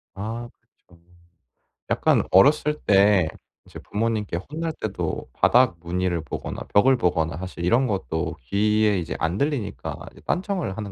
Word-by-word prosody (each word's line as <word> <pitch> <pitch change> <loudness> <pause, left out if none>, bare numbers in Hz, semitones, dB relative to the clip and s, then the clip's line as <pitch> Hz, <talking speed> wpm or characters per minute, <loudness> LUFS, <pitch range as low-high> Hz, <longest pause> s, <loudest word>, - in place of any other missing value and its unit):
아 115 +4 -5 0.4
그렇죠. 85 -2 -21 0.9
약간 - - +3
어렸을 150 +8 +4
때 100 -3 +5 0.4
이제 - - -11
부모님께 105 -4 -2
혼날 160 +1 -3
때도 90 - -4
바닥 120 -7 +4
무늬를 85 0 -1
보거나 75 - -6
벽을 130 +6 +5
보거나 80 -6 0
사실 90 -1 -6
이런 120 +9 +3
것도 80 - -2
귀에 105 - +2
이제 85 - -4
안 85 +3 -1
들리니까 140 -8 -2 0.2
이제 - - -17
딴청을 180 - -2
하는 105 -3 -5
100 Hz, 300 characters per minute, -24 LUFS, 85-120 Hz, 0.9 s, 때